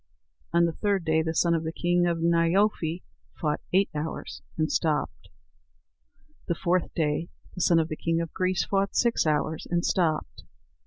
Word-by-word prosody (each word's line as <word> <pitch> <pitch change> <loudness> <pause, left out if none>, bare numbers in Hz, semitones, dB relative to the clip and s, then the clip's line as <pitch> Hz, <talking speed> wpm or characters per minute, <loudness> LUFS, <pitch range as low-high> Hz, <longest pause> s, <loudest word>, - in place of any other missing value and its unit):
On 170 0 +4
the 170 - 0
third 200 -1 0
day 160 0 +3
the 160 0 -2
son 170 +1 +3
of 165 -1 0
the 160 - -3
king 175 +1 +1
of 170 -1 0
Nyerfói 170 +1 +1 0.4
fought 150 -2 -1
eight 195 +2 +4
hours, 155 +1 -5 0.2
and 155 -1 0
stopped. 155 -2 -1 1.2
The 170 - 0
fourth 180 +1 0
day 155 +1 0 0.2
the 180 - -5
son 170 0 +4
of 160 -1 +2
the 155 - -4
king 165 0 0
of 165 -1 -4
Greece 185 0 0
fought 195 0 0
six 235 -8 +2
hours, 155 +1 0
and 175 -1 0
stopped. 160 -4 0
170 Hz, 170 wpm, -27 LUFS, 160-180 Hz, 1.2 s, On